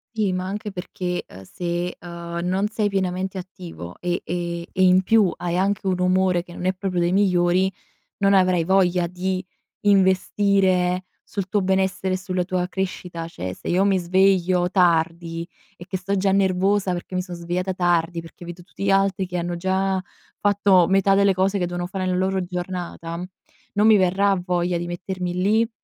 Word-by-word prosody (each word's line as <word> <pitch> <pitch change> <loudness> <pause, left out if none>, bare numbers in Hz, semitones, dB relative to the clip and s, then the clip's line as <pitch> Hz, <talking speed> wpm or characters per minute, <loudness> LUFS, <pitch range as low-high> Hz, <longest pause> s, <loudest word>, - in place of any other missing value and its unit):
Sì, 210 -4 +1
ma 185 0 -2
anche 205 +2 -5
perché, 180 -1 -4
uhm, 95 - -12
se, 175 - -3
uhm, 170 -1 -6
non 190 +3 +1
sei 215 -1 0
pienamente 190 -1 -2
attivo 175 - -9
e 175 0 -1
e 170 0 -3
e 185 - +1
in 185 0 +5
più 210 -2 +4
hai 175 0 -2
anche 195 +1 0
un 185 -1 0
umore 180 -1 +2
che 175 0 -13
non 180 - -6
è 185 - +2
proprio 185 -1 -3
dei 175 +1 +1
migliori, 185 -1 +3 0.5
non 200 0 +3
avrai 185 -3 +3
voglia 180 -1 +3
di 185 +1 -3 0.4
investire 190 -2 +2 0.2
sul 200 -3 -5
tuo 205 - +1
benessere, 190 0 0
sulla 185 0 -2
tua 180 -1 -1
crescita. 180 -3 -4
Cioè 95 - -5
se - - -8
io 185 +3 +3
mi 195 -1 +3
sveglio 185 0 +2
tardi 170 -2 +1 0.3
e 175 - -10
che 185 - -3
sto 200 +2 -2
già 195 0 +2
nervosa 195 0 +2
perché 175 +1 -7
mi 185 - 0
son 180 -1 -8
svegliata 175 +2 -3
tardi, 175 -1 +1
perché 165 +1 -13
vedo 175 +1 -8
tutti 195 +2 -8
gli 195 - +2
altri 195 -1 +2
che 180 - -5
hanno 175 0 -2
già 190 +1 0 0.4
fatto 200 -3 +4
metà 195 0 +4
delle 200 -1 +4
cose 190 +2 +1
che 180 - 0
devono 175 0 -3
fare 185 +1 -3
nella 185 0 0
loro 190 +1 0
giornata, 175 -1 -5 0.5
non 210 +1 +3
mi 220 -1 +7
verrà 195 +2 +3
voglia 175 -1 0
di 175 - -4
mettermi 180 0 -4
lì, 215 +5 +2
185 Hz, 180 wpm, -23 LUFS, 175-195 Hz, 0.5 s, mi